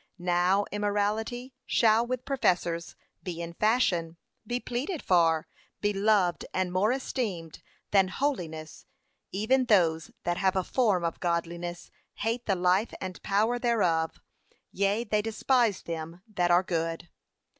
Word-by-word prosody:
Now 180 +2 +2
immorality 210 +5 -1
shall, 225 +1 +4
with 255 0 -3
professors, 175 -10 0 0.3
be 175 -3 -5
in 170 0 -5
fashion, 175 -6 +1 0.3
be 245 0 -1
pleaded 270 +8 -3
for, 165 -3 +3 0.3
be 205 0 0
loved 195 -3 +2
and 185 -1 0
more 200 +5 +3
esteemed 215 - -3 0.3
than 195 -2 +5
holiness; 175 - -3 0.4
even 250 +7 +2
those 170 -6 +3
that 175 0 -1
have 190 0 +2
a 190 - +1
form 205 -5 +1
of 165 -1 -2
godliness, 175 0 -3 0.2
hate 230 +3 -2
the 195 - +2
life 180 +4 +1
and 185 -1 -6
power 220 +5 +1
thereof, 180 -10 +1 0.5
yea, 200 +4 +1
they 210 -2 +1
despise 225 0 +1
them 165 +2 -6
that 180 -5 0
are 175 +1 +5
good.' 165 -1 -2
195 Hz, 135 wpm, -28 LUFS, 175-225 Hz, 0.5 s, than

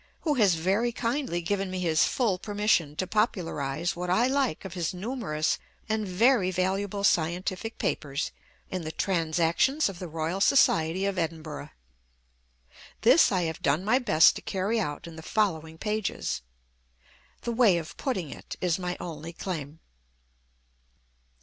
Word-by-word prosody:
who 305 - +1
has 205 -10 +4
very 195 +9 +1
kindly 235 -5 -1
given 195 +2 -1
me 185 0 -3
his 165 -3 +3
full 220 -8 0
permission 205 -7 +1
to 185 - -1
popularise 175 - -1
what 180 +1 -4
I 220 +7 +3
like 260 - 0
of 190 - -6
his 175 -1 -2
numerous 190 -7 -1 0.3
and 215 -2 -1
very 200 +1 +3
valuable 195 +2 -1
scientific 185 +5 0
papers 140 +1 -2 0.4
in 185 - -2
the 155 -1 -5
Transactions 170 - +1
of 185 -3 -8
the 180 - -5
Royal 165 +4 -3
Society 185 -6 +4
of 195 -2 -1
Edinburgh. 155 -3 -4 1.3
This 255 +8 +6
I 185 -3 +1
have 160 -1 -3
done 150 +7 +1
my 245 +5 +4
best 175 -10 +5
to - - -8
carry 200 +4 -1
out 150 -7 -3
in 165 -1 -10
the - - -7
following 160 -5 -1
pages. 210 - -2 1.0
"The 235 - -2
way 225 -6 +4
of 160 -2 -6
putting 190 - -2
it" - - -8
is 180 -1 0
my 180 -1 -3
only 165 -1 -7
claim. 160 -4 -5
185 Hz, 150 wpm, -27 LUFS, 165-215 Hz, 1.3 s, This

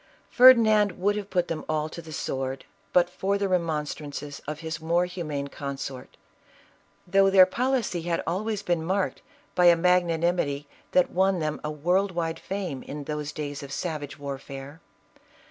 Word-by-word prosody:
Ferdinand 220 -6 +7
would 200 +4 0
have 205 -1 -5
put 180 -2 +1
them 165 - -4
all 155 -1 0
to 170 - -8
the 160 -1 -11
sword 135 -2 -3 0.3
but 175 -1 +4
for 195 +3 -1
the 200 0 0
remonstrances 150 -4 -3
of 150 +1 -5
his 160 -1 -5
more 170 +2 +2
humane 155 -6 -4
consort, 140 -2 -7 0.9
though 195 +2 +4
their 190 -1 +8
policy 240 -3 -1
had 170 0 -1
always 205 +4 -2
been 175 -3 0
marked 190 +3 -1 0.3
by 180 - +3
a 175 -1 +8
magnanimity 170 -4 +1 0.3
that 180 - +4
won 190 +1 +2
them 155 -2 -2
a 150 - -2
world 180 +6 +1
wide 165 -1 -2
fame 185 -9 -4
in 145 0 -7
those 150 0 -4
days 145 -1 -5
of 140 -1 -9
savage 150 -1 -4
warfare. 140 +1 -7
170 Hz, 160 wpm, -26 LUFS, 150-185 Hz, 0.9 s, their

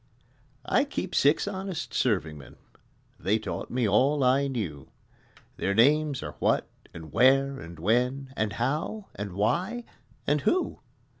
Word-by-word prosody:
I - - +3
Keep - - -4
six 145 +7 +3
honest 190 -4 -4
serving 90 -11 0
men: 70 - -13 0.6
(They 100 +6 +2
taught 110 - -5
me 120 -2 0
all 135 +8 +3
I 135 +2 +3
knew) 95 - -4 0.7
Their 100 - 0
names 145 +4 +3
are - - -6
What - - +1 0.2
and 80 -2 -10
Where 135 +3 +4
and 85 0 -10
When 125 - 0
And 110 -4 -1
How 155 - -2
and 100 -2 -6
Why 175 - 0 0.4
and 145 0 +2
Who. 365 - 0
130 Hz, 140 wpm, -27 LUFS, 105-145 Hz, 0.7 s, Where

